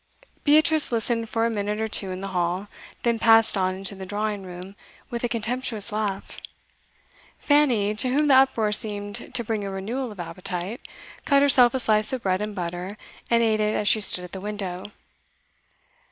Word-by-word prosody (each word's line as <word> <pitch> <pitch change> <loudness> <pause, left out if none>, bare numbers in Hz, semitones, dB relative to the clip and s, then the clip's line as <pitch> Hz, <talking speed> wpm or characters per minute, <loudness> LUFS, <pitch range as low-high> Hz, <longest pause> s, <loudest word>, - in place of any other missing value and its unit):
Beatrice 310 0 +3
listened 230 0 -1
for 225 0 0
a 230 - 0
minute 210 0 -3
or 220 - -1
two 200 -3 0
in 185 0 -6
the 195 - -5
hall, 180 +2 -2 0.4
then 235 -1 +1
passed 225 -1 +5
on 185 -1 0
into 195 0 -6
the 190 -1 -9
drawing 205 +1 -3
room 185 +1 -9 0.4
with 235 0 -4
a 240 - 0
contemptuous 230 -1 -2
laugh. 210 -2 -4 1.0
Fanny, 250 -9 +2
to 235 +4 +1
whom 295 +4 +1
the 280 - +5
uproar 260 -5 +3
seemed 205 +1 0
to 235 - 0
bring 220 -2 -3
a 200 - -4
renewal 225 +6 -4
of 205 - -13
appetite, 180 +5 -5 0.4
cut 280 -1 +3
herself 255 -3 +6
a - - 0
slice 215 -3 +3
of 255 - -4
bread 185 0 0
and 210 -1 -4
butter, 180 +2 -5 0.3
and 235 0 +3
ate 220 -1 +1
it 210 0 0
as 210 - -1
she 215 - +4
stood 180 -3 +6
at 180 - -10
the 190 - -7
window. 195 -3 -5
215 Hz, 185 wpm, -24 LUFS, 195-235 Hz, 1.0 s, herself